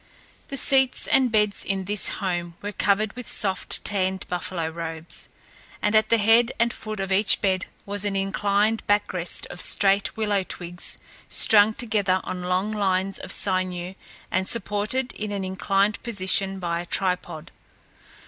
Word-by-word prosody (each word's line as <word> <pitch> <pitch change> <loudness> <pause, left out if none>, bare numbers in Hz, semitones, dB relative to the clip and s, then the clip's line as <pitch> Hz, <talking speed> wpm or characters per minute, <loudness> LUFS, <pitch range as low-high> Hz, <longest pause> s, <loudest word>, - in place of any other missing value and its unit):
The 275 - -5
seats 265 -1 +2
and 260 -3 +3
beds 210 -2 +2
in 195 -1 -2
this 205 +2 +2
home 175 -3 -2
were 205 - -3
covered 205 +1 +1
with 250 -1 -7
soft 190 -3 0
tanned 190 -2 0
buffalo 175 -2 -2
robes, 165 0 -6 0.5
and 210 - 0
at 215 0 +4
the 230 - +5
head 225 +3 +4
and 235 0 +2
foot 215 -1 -6
of 195 0 -3
each 195 +2 +4
bed 190 -2 0 0.2
was 205 0 -1
an 205 -1 -1
inclined 205 +2 +1
back 205 0 +2
rest 175 -1 -2
of 175 - -5
straight 200 +1 +3
willow 210 -2 +1
twigs, 175 -1 -6 0.3
strung 215 0 +5
together 205 -6 0
on 180 - -4
long 180 +3 0
lines 195 -2 0
of - - -7
sinew 185 -1 -2 0.4
and 190 0 0
supported 235 +3 -2
in 210 -1 -5
an 200 -2 -3
inclined 195 +2 0
position 195 -3 +1
by 170 -2 -2
a 175 - -10
tripod. 180 -5 -2
195 Hz, 160 wpm, -24 LUFS, 185-215 Hz, 0.5 s, the